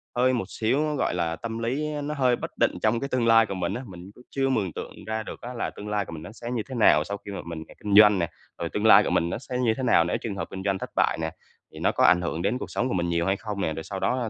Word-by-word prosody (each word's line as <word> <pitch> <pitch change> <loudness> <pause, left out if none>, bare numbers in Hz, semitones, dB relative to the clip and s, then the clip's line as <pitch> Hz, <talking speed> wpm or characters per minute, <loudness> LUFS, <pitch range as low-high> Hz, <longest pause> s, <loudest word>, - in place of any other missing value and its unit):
hơi 130 +1 +3
một 120 - -1
xíu 135 +7 0
á, 150 - -1
gọi - - 0
là, 85 -2 -1
tâm 115 +2 -5
lý 135 +7 -1
nó 150 - -3
hơi 130 -4 +2
bất - - -6
định - - +3
trong 115 +2 +2
cái 140 - -3
tương 125 -3 +1
lai 115 0 +6
của 100 - -5
mình 90 -2 -2
á. 125 - -4
Mình 90 0 -11
cũng 125 - -16
chưa 135 -1 0
mường 100 -10 0
tượng - - -8
ra 110 0 -2
được - - -9
á 125 +1 -6
là 120 - -2
tương 105 - -9
lai 105 -1 0
của - - -10
mình 80 -1 -7
nó 105 - -9
sẽ 120 +1 -7
như 120 -3 -1
thế 130 - -5
nào 90 -9 +5
sau 100 +3 -5
khi 100 - -6
mà 100 - -5
mình 85 -2 -6
ra - - -14
kinh 105 -1 +1
doanh 105 -2 +8
nè. 85 - 0 0.3
Rồi - - -2
tương - - -2
lai - - +8
của - - -1
mình 85 - +1
nó - - -2
sẽ 125 0 -5
như 120 -3 +2
thế 130 - -3
nào 115 -9 +5
nếu 85 - -1
trường 110 -4 -4
hợp 95 - -4
kinh 95 0 -6
doanh 100 -1 0
thất - - -5
bại - - +2
nè, 80 0 -2 0.4
thì - - -9
nó - - +2
có - - +1
ảnh 90 - +6
hưởng 85 -1 -2
đến 105 +7 0
cuộc - - -7
sống 125 - 0
của - - -2
mình 85 -2 0
nhiều 85 0 +1
hay 95 +2 +1
không 105 -2 -5
nè, 80 - 0
rồi 80 - -6
sau 95 +2 -5
đó 120 +4 0
105 Hz, 335 wpm, -26 LUFS, 90-125 Hz, 0.4 s, doanh